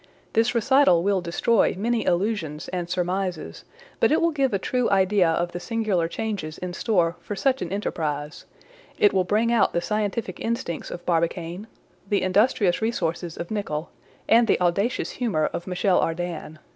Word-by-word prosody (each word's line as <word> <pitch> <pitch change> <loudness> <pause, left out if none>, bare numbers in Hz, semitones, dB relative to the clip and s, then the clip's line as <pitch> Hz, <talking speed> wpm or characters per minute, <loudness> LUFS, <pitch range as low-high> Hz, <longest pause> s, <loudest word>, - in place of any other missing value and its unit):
This 230 +3 +2
recital 235 -7 +4
will 195 -1 +1
destroy 185 +6 +2
many 230 +3 0
illusions 175 -5 -1
and 175 -2 -4
surmises; 180 -1 -3 0.3
but - - +3
it 310 - +4
will 335 0 +2
give 275 -4 +1
a 200 - +1
true 250 +5 0
idea 190 -2 +3
of 170 +2 0
the 175 - -5
singular 210 -5 0
changes 185 -5 -4
in 180 -1 -5
store 175 -4 +1
for 205 - -5
such 265 +5 +1
an 175 - -4
enterprise; 150 -7 -3 0.5
it 205 - +4
will 190 -1 +3
bring 220 +5 +1
out 235 - +3
the 170 - +2
scientific 210 -1 -2
instincts 230 -8 -3
of 175 - -8
Barbicane, 170 +3 -1 0.4
the 205 - +1
industrious 195 0 +2
resources 175 -7 -2
of 170 - -6
Nicholl, 170 -7 -3 0.4
and 230 +1 +5
the - - +3
audacious 190 +7 0
humor 205 -12 0
of 175 - -5
Michel 180 0 +2
Ardan. 165 -2 -3
190 Hz, 165 wpm, -24 LUFS, 170-220 Hz, 0.5 s, and